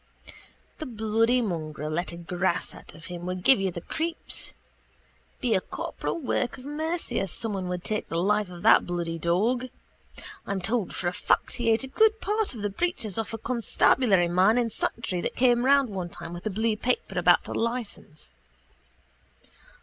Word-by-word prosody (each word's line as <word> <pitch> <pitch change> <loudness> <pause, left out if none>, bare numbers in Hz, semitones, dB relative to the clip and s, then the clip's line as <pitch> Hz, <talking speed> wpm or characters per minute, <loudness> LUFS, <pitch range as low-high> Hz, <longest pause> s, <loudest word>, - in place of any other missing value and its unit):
The 310 - -5
bloody 225 +2 +2
mongrel 155 -6 -3
let 175 +3 -1
a 170 - -8
grouse 175 +1 -1
out - - -13
of 165 +2 -12
him 175 0 -6
would 185 0 -4
give 265 +1 +6
you 195 - +1
the 170 -1 -6
creeps. 330 - -4 0.9
Be 240 -3 +2
a 190 - +3
corporal - - -4
work 250 -3 -1
of 255 - -12
mercy 315 +4 -2
if 195 -4 -4
someone 200 -5 -3
would 180 -1 -3
take 215 -1 -2
the 165 - -2
life 205 +2 +1
of 175 -1 -10
that - - +6
bloody 170 -2 -2
dog. 215 +10 +1 0.8
I'm 200 -1 -1
told 205 +1 -1
for 175 - -2
a 175 - 0
fact - - +1
he 235 -1 0
ate 225 +3 +3
a - - -3
good 440 +10 +3
part 420 - -1
of 215 - -7
the 205 - 0
breeches 225 - -2
off 225 - -3
a - - -4
constabulary 225 -4 +3
man 185 +6 +4
in 235 -2 +1
Santry 200 -5 -2
that - - -3
came 245 -1 +4
round 275 -3 +4
one 185 -3 -4
time 170 - -8
with 175 +4 -5
a - - +1
blue 220 +2 0
paper 245 +3 -1
about - - +4
a - - -4
licence. 230 -10 -4
210 Hz, 185 wpm, -27 LUFS, 175-245 Hz, 0.9 s, give